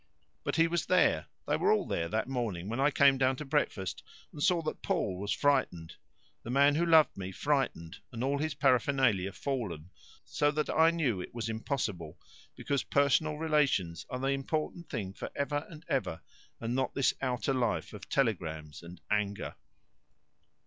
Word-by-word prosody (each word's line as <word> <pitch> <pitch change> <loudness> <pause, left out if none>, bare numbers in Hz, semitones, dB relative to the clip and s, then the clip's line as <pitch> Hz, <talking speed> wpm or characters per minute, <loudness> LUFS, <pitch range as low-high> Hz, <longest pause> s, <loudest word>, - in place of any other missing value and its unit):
"But - - -2
he 165 0 +4
was 165 -4 -1
there, - - +3 0.2
they - - +2
were - - +3
all - - +2
there 85 - -1
that 110 +2 -1
morning 110 -8 -3
when 115 +3 -3
I 140 +2 +4
came 140 -2 +4
down 130 0 +3
to 150 - -7
breakfast, 135 - -1 0.3
and 145 - -9
saw 180 -1 +3
that 155 - -4
Paul 90 -1 -1
was 100 +1 -3
frightened 130 - +1 0.5
the - - -9
man 140 +3 +5
who 170 +3 +1
loved 160 -2 +6
me 95 -1 -5
frightened 135 - -1
and 120 0 -4
all 140 +2 0
his 155 0 -2
paraphernalia 130 -7 +2
fallen, 95 - -4 0.3
so 145 - +1
that 150 +1 -1
I 160 +1 +5
knew 140 - 0
it 90 - -9
was 115 -1 -3
impossible, 105 - -3 0.4
because 140 -2 -1
personal 145 +2 +2
relations 145 - +1
are 125 - -3
the 135 +1 -1
important 155 +5 -2
thing 100 -7 -4
for - - -6
ever 145 +1 -2
and 160 -1 -12
ever, 125 -11 -1 0.4
and 115 +1 -3
not 130 0 -1
this 135 - +3
outer 130 +1 0
life 120 -4 -1
of 105 - -10
telegrams 80 - -1
and 85 +1 -11
anger." 105 -1 -1
130 Hz, 175 wpm, -31 LUFS, 100-145 Hz, 0.5 s, loved